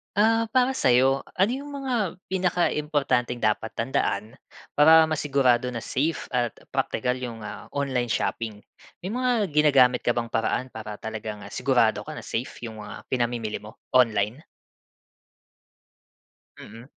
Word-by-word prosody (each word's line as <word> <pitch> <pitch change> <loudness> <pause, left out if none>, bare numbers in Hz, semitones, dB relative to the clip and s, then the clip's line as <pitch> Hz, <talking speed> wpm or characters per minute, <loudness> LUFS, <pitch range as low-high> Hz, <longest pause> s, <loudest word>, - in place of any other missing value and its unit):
Ah, 225 +2 +3
para 255 +3 +2
sayo, 135 - +3
ano 195 +5 +3
yung 285 +2 -5
mga 245 -10 -1 0.2
pinakaimportanteng 150 -9 0
dapat 110 +1 +1
tandaan, 115 -3 -2 0.3
para 160 +2 +7
masigurado 135 -5 +2
na 120 -2 -4
safe 155 +5 -2
at 120 -3 0 0.2
praktikal 125 +2 -1
yung, 115 -3 -6
ah, 105 0 -8
online 130 -4 0
shopping. 110 -2 -2 0.4
May 185 - -3
mga 245 -2 +1
ginagamit 140 -4 +5
ka 120 - 0
bang 115 -1 -2
paraan 125 +3 -1
para 110 -1 -7
talagang 110 -1 -6
sigurado - - +2
ka - - -6
na - - -8
safe 120 +1 -5
yung 110 -2 -7
mga 105 0 -9
pinamimili 120 -3 -1
mo, 105 +1 -12 0.2
online? 115 -1 +3 2.2
Mm. 115 +3 -11
125 Hz, 130 wpm, -25 LUFS, 115-160 Hz, 2.2 s, para